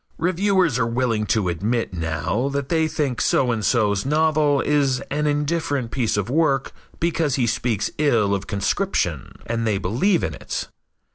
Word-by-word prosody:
Reviewers 180 - +1
are 115 - +1
willing 115 -3 0
to 105 -5 +1
admit 105 +6 -1
now 80 - -1
that 140 -1 -3
they 160 -2 +2
think 150 -5 -2
so 125 -2 +2
and 110 -2 -2
so's 105 -4 +2
novel 150 0 +2
is 140 -4 +1
an 150 +1 0
indifferent 145 -4 -1
piece 115 -3 0
of 100 - -1
work 135 -1 +1 0.3
because 165 -4 0
he 125 - +1
speaks 115 -2 -1
ill 110 -9 +2
of 100 0 -3
conscription 100 - -1
and 115 0 -2
they 105 -2 +1
believe 125 - +1
in 80 - -2
it. - - -5
130 Hz, 160 wpm, -22 LUFS, 110-150 Hz, 0.3 s, they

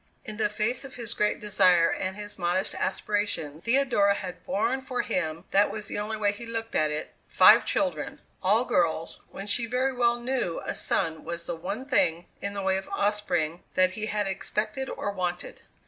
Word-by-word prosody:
In 215 -1 -6
the 215 - +1
face 215 +5 -1
of 270 - -10
his 235 -2 -2
great 210 - +1
desire 185 -5 +4
and 190 0 -2
his 205 -1 -7
modest 180 +2 +1
aspirations 185 -6 -2
Theodora 235 -5 +3
had 180 -3 -6
borne 235 +6 0
for 260 -1 -2
him 160 -1 -2
(that 200 +1 +4
was 215 -1 -5
the 205 - -3
only 215 +1 -3
way 205 -1 +2
he 205 +3 -9
looked 225 -1 -4
at 155 -1 +2
it) 150 +1 -4
five - - +7
children - - -1 0.2
all 210 +6 +3
girls, 165 -4 0
when 195 - -7
she 230 +3 0
very 255 +3 +1
well 240 -1 +2
knew 240 -8 -1
a - - -2
son 160 -1 -1
was 170 0 -5
the 175 - -3
one 200 +10 -5
thing, 175 -11 +2 0.2
in 200 0 -4
the 200 - -3
way 190 0 +2
of 190 - -6
offspring, 180 -6 0
that 185 0 +4
he 215 +3 -4
had 210 -1 0
expected 210 +6 -2
or 205 - -3
wanted. 180 -2 -4
205 Hz, 195 wpm, -27 LUFS, 180-225 Hz, 0.2 s, five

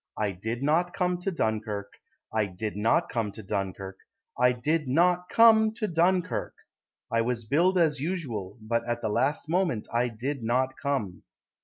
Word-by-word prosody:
I 105 -2 0
did 110 +7 -4
not 165 +5 +1
come 180 -1 0
to 180 - -2
Dunkirk, 105 - -2 0.4
I 110 -2 +1
did 100 +3 -5
not 115 +11 +2
come 115 -4 -2
to 110 - -9
Dunkirk, 95 -1 -4 0.4
I 125 0 +4
did 150 +5 -1
not 175 +6 +2
come 220 -1 +6
to 220 -1 -2
Dunkirk; 175 +1 0 0.6
I 115 - +2
was 115 -1 -2
billed 175 - +2
as 155 -5 +2
usual, 130 - -4
But 115 +1 0
at 120 0 -2
the - - 0
last 140 +8 0
moment 170 - 0
I 120 +1 +2
did 125 +4 -4
not 130 +3 +1
come. 130 -10 -2
125 Hz, 165 wpm, -27 LUFS, 110-170 Hz, 0.6 s, come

